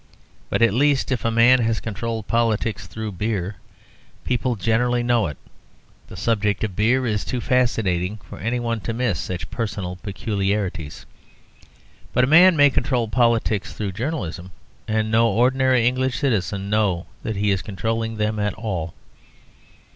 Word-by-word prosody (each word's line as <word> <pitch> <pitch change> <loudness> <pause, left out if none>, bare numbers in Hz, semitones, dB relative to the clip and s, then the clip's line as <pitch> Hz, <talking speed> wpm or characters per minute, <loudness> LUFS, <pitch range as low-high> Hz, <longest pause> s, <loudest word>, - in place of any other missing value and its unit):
But - - +1
at 115 -3 +4
least, 140 +2 +2
if 125 - -1
a 115 - +1
man 115 +3 +5
has 115 -2 0
controlled 115 0 -4
politics 110 -4 0
through 110 +3 -5
beer, 100 -1 -3 0.7
people 125 0 0
generally 120 +3 +1
know 120 -4 +2
it: 75 - -7 0.7
the - - -11
subject 105 -2 0
of 105 -4 -2
beer 125 +5 +2
is 105 -3 -1
too 125 - -3
fascinating 110 -7 0
for - - -10
any 115 +3 -1
one 115 -1 -2
to 115 - -4
miss 115 -8 -1
such 90 -1 -5
personal 100 -6 -4
peculiarities. 100 -5 -3 1.1
But 125 - +3
a 135 +4 +2
man 180 +2 +8
may 145 -1 +6
control 125 -3 0
politics 115 -3 +1
through 100 -2 -3
journalism, 95 - -4 0.4
and 110 0 0
no 115 +1 +4
ordinary 130 +1 +3
English 130 +1 0
citizen 100 - -1
know 100 -5 +1 0.2
that 110 - -3
he 100 +1 +1
is 95 -2 0
controlling 115 +2 -3
them 105 0 -1
at 105 -1 -1
all. 95 -6 -4
110 Hz, 155 wpm, -22 LUFS, 100-120 Hz, 1.1 s, man